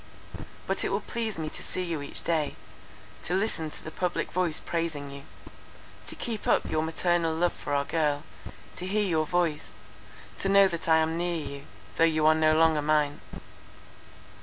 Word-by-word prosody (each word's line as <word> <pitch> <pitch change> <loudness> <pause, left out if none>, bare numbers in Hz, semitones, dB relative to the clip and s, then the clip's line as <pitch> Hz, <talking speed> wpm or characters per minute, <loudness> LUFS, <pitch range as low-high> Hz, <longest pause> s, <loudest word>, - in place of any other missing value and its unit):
But - - 0
it - - 0
will - - 0
please 225 -5 -3
me 160 -1 -3
to - - -5
see 185 - -3
you 165 -4 -3
each 145 - -3
day! 160 -3 0 0.7
to 175 - -2
listen 190 -6 0
to - - -8
the 160 - -7
public 180 +1 -2
voice 175 -3 +1
praising 160 -4 -3
you; 140 0 -8 0.9
to - - -5
keep 225 -3 -4
up - - +3
your 155 0 0
paternal 165 0 +1
love 175 +2 +1
for 145 - -3
our 140 0 +1
girl; 150 -3 0 0.5
to 180 - -4
hear 210 +2 +1
your 160 -3 +1
voice; 170 -3 0 0.7
to 195 - +1
know 200 0 +7
that 170 -2 -4
I 160 - +7
am 160 +1 +1
near 175 -1 0
you, 140 -2 -6 0.3
though - - +4
you 155 -2 +3
are 155 - +7
no 155 0 +3
longer 160 -2 +4
mine. 150 -1 +1
160 Hz, 185 wpm, -28 LUFS, 155-175 Hz, 0.9 s, know